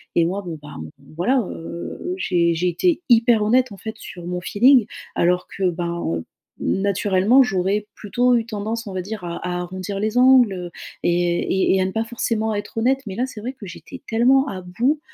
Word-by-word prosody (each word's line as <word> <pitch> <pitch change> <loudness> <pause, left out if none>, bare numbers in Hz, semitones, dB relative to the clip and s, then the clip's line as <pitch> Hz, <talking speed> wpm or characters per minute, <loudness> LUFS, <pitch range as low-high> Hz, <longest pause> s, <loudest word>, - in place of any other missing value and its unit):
et 170 - +4
moi, 195 +4 -2
bon, 165 -3 -6
ben, 145 0 -10
on, 80 0 -7 0.3
voilà, 250 +10 +2
heu, 170 - -6
j'ai 170 - +2
j'ai 175 +2 0
été 340 - +1
hyper 235 -1 +5
honnête, 250 +2 +3
en 200 - -9
fait, 220 +4 -6
sur 175 -5 -9
mon 180 0 -2
feeling 245 +5 +5 0.3
alors 180 +1 +1
que, 190 -2 -1
ben, 170 0 -3 0.2
heu, 80 - -9 0.3
naturellement, 200 +4 +3
j'aurais 205 -2 0
plutôt 245 +5 +1
eu 230 -1 +1
tendance, 220 +1 -4
on 200 - -7
va 185 - -2
dire, 205 +1 -6
à 170 -1 -4
à 180 0 -2
arrondir 185 +2 -5
les 215 +3 -1
angles, 255 -5 +6
heu 180 -2 -6 0.3
et 175 0 +1 0.3
et - - +4
et 190 - +2
à - - +2
ne 190 - -2
pas 225 +3 -1
forcément 225 -1 -1
être 205 +2 -5
honnête 260 +4 +2
mais 190 - -5
là, 245 - 0
c'est 250 -5 -9
vrai 250 +4 -4
que 240 -6 -11
j'étais 190 +9 -10
tellement 260 +5 +3
à 190 -7 -5
bout, 240 +12 0
205 Hz, 210 wpm, -22 LUFS, 180-240 Hz, 0.3 s, angles